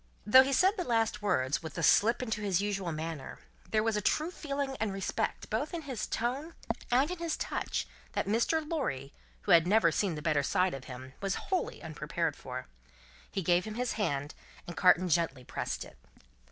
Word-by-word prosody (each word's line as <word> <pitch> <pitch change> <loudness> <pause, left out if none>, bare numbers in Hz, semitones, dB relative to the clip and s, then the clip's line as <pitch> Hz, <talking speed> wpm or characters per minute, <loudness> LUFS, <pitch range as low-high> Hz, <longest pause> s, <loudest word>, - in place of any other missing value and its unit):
Though 260 +5 +9
he 270 +1 0
said 375 - +4
the 360 - 0
last 225 -5 +1
words, 145 -9 +1
with 160 +1 -8
a 165 - -2
slip 230 +8 +4
into 220 -3 -2
his 195 -4 +1
usual 195 -3 -1
manner, 155 -2 -5 0.3
there 215 -1 +2
was 225 -1 +1
a 210 - 0
true 310 - +1
feeling 280 -5 -3
and 220 -2 0
respect 195 0 -2
both - - -1
in 330 - -4
his 260 -7 -4
tone 270 +8 -2 0.3
and 265 +7 +3
in 360 - -4
his 335 -2 -1
touch, - - -2 0.3
that - - 0
Mr. 240 +9 +1
Lorry, 140 - -2 0.3
who 200 - 0
had 170 0 +7
never 190 -4 +5
seen 185 +1 0
the 150 - -6
better 150 -3 +2
side 180 +6 +1
of 135 -1 -7
him, 130 +1 -9
was 195 -1 0
wholly 375 -2 -2
unprepared 160 -2 -2
for. - - -6 0.7
He 195 - -2
gave 175 +2 +3
him 215 -1 -5
his 245 0 -1
hand, 145 -9 -1 0.3
and 170 - -7
Carton 185 0 +5
gently 165 -6 +1
pressed - - -4
it. - - -16
205 Hz, 195 wpm, -31 LUFS, 165-255 Hz, 0.7 s, Though